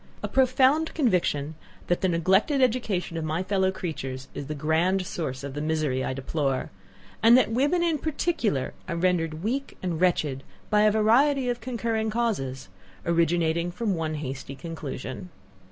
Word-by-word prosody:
a - - 0
profound 265 +4 +3
conviction, 175 - +1 0.3
that 175 - 0
the 190 - +2
neglected 190 - +2
education 220 -9 0
of 165 - -2
my 155 +3 -1
fellow 190 -1 +1
creatures 135 -8 -5
is 140 - -6
the 155 - -4
grand 165 +6 +1
source 135 -7 -4
of 140 -1 -5
the 145 - -4
misery 155 -4 0
I - - -2
deplore; 135 0 -2 0.5
and 230 +2 +7
that 255 - +3
women 285 +9 +2
in 330 -3 +1
particular, 260 - -1
are 170 - -2
rendered 170 -2 0
weak 270 +6 -2
and 170 -3 -2
wretched 150 -7 +1 0.3
by 210 0 +5
a 215 - +5
variety 250 +5 +3
of 240 -1 -2
concurring 225 -2 -1
causes, 195 - -2 0.4
originating 170 0 +1
from 200 +3 -1
one 160 -2 -2
hasty 135 -2 -5
conclusion. 150 +1 -6
180 Hz, 155 wpm, -26 LUFS, 155-230 Hz, 0.5 s, and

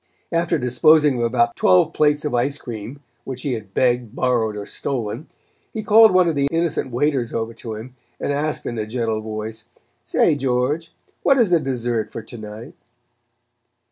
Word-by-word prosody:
After 170 0 +1
disposing 145 +2 +4
of - - 0
about 120 0 +1
twelve 90 -1 +4
plates 150 0 +2
of 150 - -2
ice 130 +4 +1
cream, 120 +2 -8 0.2
which 130 -1 -6
he 140 - -1
had 105 -4 -6
begged, 120 -2 +1
borrowed 115 -5 0
or 100 - -5
stolen, 120 +2 -4 0.5
he 220 - -3
called 220 +1 +7
one 185 -1 +4
of 165 - +1
the 140 -1 +1
innocent 165 -5 0
waiters 130 -1 0
over 115 0 -2
to 115 -1 -7
him 120 +4 -9 0.2
and 145 - -1
asked 150 +2 -2
in 120 -2 -3
a 105 - -3
gentle 115 -2 -2
voice: 110 0 -6 0.4
"Say, - - +2
George, 135 +4 -1 0.3
what 275 - +4
is 230 -7 +3
the 170 - +5
dessert 120 -5 -2
for 110 - -7
to 120 +2 -10
night?" 110 +2 -9
125 Hz, 175 wpm, -21 LUFS, 115-150 Hz, 0.5 s, called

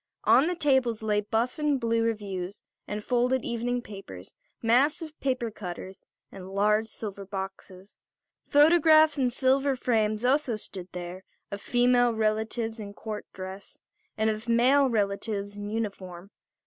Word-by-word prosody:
On 285 - +5
the 355 - -1
tables 265 -8 +2
lay 210 -1 +1
buff 225 +6 -1
and 295 -2 +1
blue 230 -1 +1
reviews 205 -4 -3 0.2
and 210 0 -4
folded 250 +2 +1
evening 240 +1 -2
papers, 145 - -10 0.3
massive 285 +7 +2
paper 255 -4 -1
cutters 190 -1 -8 0.2
and 190 -1 -10
large 210 +3 +2
silver 205 -3 -7
boxes. 190 0 -8 0.5
Photographs 310 0 +5
in 255 -2 +2
silver 265 +2 +2
frames 220 -2 0
also 260 -2 +2
stood 190 -4 -6
there, 180 +1 -7 0.3
of 200 0 -5
female 245 -1 +3
relatives 220 +1 -1
in 205 -1 -8
court 215 -1 -6
dress 190 +1 -9 0.4
and 220 0 +2
of 215 +2 -6
male 260 +4 +4
relatives 205 -1 -2
in 205 0 -6
uniform. 200 -4 -5
220 Hz, 135 wpm, -27 LUFS, 200-250 Hz, 0.5 s, On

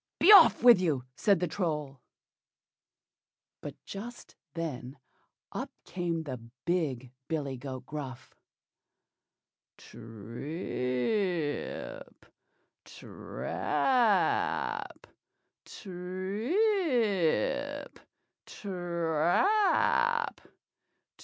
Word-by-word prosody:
be 380 - +7
off 395 - +8
with 240 -6 +8
you," 150 -8 0
said 200 -4 +3
the 180 - +1
Troll. 150 -6 -3 1.6
But - - -7
just 235 +5 -9 0.2
then 140 -5 -5 0.5
up - - -4 0.2
came 170 -2 -2
the 130 -5 -6 0.3
big 140 -8 -1 0.2
billy 145 -5 -2
goat 130 0 -7
Gruff. 135 -4 -7 1.4
"TRIP, 140 - -4 0.6
TRAP! 235 -7 -1 0.6
TRIP, 185 +4 -6 2.0
TRAP! 185 - +1
170 Hz, 60 wpm, -30 LUFS, 135-195 Hz, 2.0 s, off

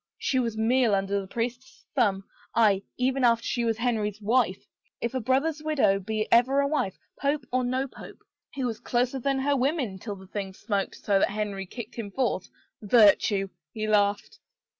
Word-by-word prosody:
She 260 - 0
was 230 -3 -1
meal 230 -1 +3
under 195 +1 0
the 190 - -9
priest's 245 +5 -5
thumb 200 -8 +2 0.2
— - - -29
aye, 195 -2 +3 0.2
even 260 +1 +1
after 230 -1 +4
she 240 - -1
was 225 -1 0
Henry's 220 -4 -1
wife, 215 -2 +1 0.2
— - - -55
if 235 - -2
a 260 - 0
brother's 275 +6 0
widow 270 -11 +2
be 215 +2 -2
ever 255 +4 +5
a 280 - +3
wife, 280 -10 -1 0.2
pope 280 -1 0
or 255 0 +1
no 255 +2 -1
pope! - - -13 0.3
He 275 - -4
was 225 -3 -3
closer 250 +2 0
than 275 +2 0
her 280 +2 +1
women 260 - -1
till 205 +1 -5
the 190 0 -13
thing 195 -1 -5
smoked 200 -2 -2
so 200 -2 +1
that - - +3
Henry 200 -2 -3
kicked 235 +3 -8
him 220 -3 -4
forth. 235 -4 -1 0.3
Virtue! 205 -2 +4
" 155 -1 -65
He 215 -1 -2
laughed. 205 -1 +1
230 Hz, 195 wpm, -27 LUFS, 200-260 Hz, 0.3 s, ever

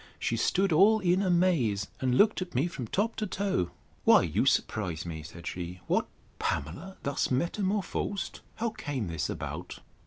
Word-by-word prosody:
—She 115 - -1
stood 185 - +2
all 205 +7 +6
in 185 -1 +2
amaze, 170 - +2
and 130 -1 +1
looked 210 -2 +4
at 180 -5 -5
me 130 +5 +3
from 135 -9 -5
top 210 - 0
to 215 - -1
toe: 185 - 0 0.3
Why, - - +7
you - - +1
surprise 90 -7 0
me, 80 -2 -5
said 80 +2 -11
she: 90 0 -5
What! - - +1 0.3
Pamela 170 - -3
thus 140 0 0
metamorphosed! 190 +5 -1 0.2
How 230 0 -1
came 145 - -4
this 80 -3 -2
about? - - -5
170 Hz, 160 wpm, -29 LUFS, -, 0.3 s, Why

